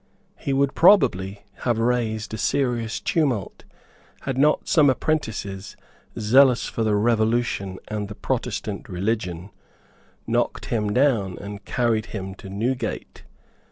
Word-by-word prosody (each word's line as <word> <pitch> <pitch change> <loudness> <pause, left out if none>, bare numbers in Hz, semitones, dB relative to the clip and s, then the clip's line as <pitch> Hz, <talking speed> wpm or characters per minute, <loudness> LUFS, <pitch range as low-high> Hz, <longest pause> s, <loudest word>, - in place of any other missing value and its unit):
He 140 - -4
would 135 0 +2
probably 100 - +4
have 120 -3 0
raised 115 -2 0
a - - -3
serious 120 +1 0
tumult, 130 - -1 0.6
had 135 - -3
not 150 +3 +2
some 150 -4 +5
apprentices, 110 -10 -2 0.4
zealous 125 +3 +5
for 115 - -2
the 110 -1 +2
Revolution 110 -3 +1
and 105 -1 -3
the 105 - -8
Protestant - - -3
religion, 95 -1 -2 0.7
knocked - - -1
him 105 -3 -1
down 115 -7 +2
and 100 0 -8
carried 115 -3 0
him 95 -2 -6
to 95 - -11
Newgate. 120 +7 -3
110 Hz, 125 wpm, -23 LUFS, 100-125 Hz, 0.7 s, some